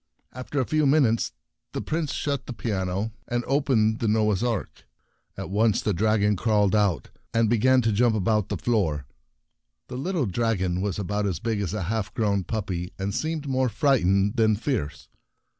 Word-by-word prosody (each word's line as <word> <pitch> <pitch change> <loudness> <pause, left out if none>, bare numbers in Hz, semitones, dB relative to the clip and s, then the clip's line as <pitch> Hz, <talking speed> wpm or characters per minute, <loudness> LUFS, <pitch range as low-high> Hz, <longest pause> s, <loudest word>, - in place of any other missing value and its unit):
After 130 +3 -4
a 130 - +1
few 155 +1 +1
minutes 135 -6 +3 0.4
the - - -2
Prince 155 -2 -2
shut 140 -3 -2
the - - -4
piano 100 -2 -2 0.2
and 120 0 -1
opened 125 -6 +2
the 115 - 0
Noah's 105 -1 +2
Ark. 115 -5 -3 0.5
At - - -6
once 110 +1 +2
the 105 - 0
dragon 105 +2 +2
crawled 105 -1 +2
out, 100 -6 +1 0.2
and 115 -1 +3
began 130 +2 +4
to 110 - +2
jump 115 +2 +3
about 105 0 +1
the - - -2
floor. 80 - 0 0.8
The 125 - -5
little 170 +1 -1
dragon 95 -4 0
was 100 -3 -2
about 105 +1 -1
as 90 -5 -1
big 110 -1 -1
as 100 +1 -3
a 105 - -2
half 100 +1 -2
grown 100 -4 +1
puppy, 90 -3 -3
and 100 +1 -3
seemed 155 -2 -2
more 130 -1 +1
frightened 100 - +2
than 110 -2 +4
fierce. 105 - -3
110 Hz, 175 wpm, -25 LUFS, 100-125 Hz, 0.8 s, began